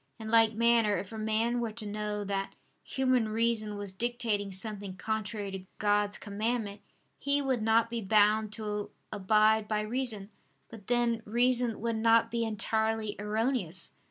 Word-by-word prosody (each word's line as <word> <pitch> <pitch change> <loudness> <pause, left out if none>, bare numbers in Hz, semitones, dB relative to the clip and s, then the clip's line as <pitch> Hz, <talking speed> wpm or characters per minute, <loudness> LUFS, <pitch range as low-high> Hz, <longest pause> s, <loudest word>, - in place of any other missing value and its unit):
In 220 -1 -7
like 225 -1 +5
manner 230 -2 +3
if 195 - -6
a - - -6
man 220 +3 0
were 230 -2 -3
to 220 -1 -5
know 210 0 -3
that 195 -1 -3 0.3
human 255 -4 +1
reason 220 -1 +1
was 200 -2 -5
dictating 225 -2 -1
something 200 0 -4
contrary 215 -1 -3
to 190 -1 -7
God's 205 -1 +1
commandment, 210 0 -3 0.4
he 280 +1 +2
would 265 -4 0
not 225 +1 +3
be 235 -1 -2
bound 215 +1 +3
to 210 -2 -4 0.2
abide 215 +1 +3
by 210 -1 0
reason: 220 -3 -2 0.4
but 220 -4 -12
then 240 -1 +1
reason 240 +1 +2
would 230 -1 -1
not 230 +1 +4
be 235 0 0
entirely 220 0 -1
erroneous. 210 -4 -1
220 Hz, 155 wpm, -30 LUFS, 205-230 Hz, 0.4 s, like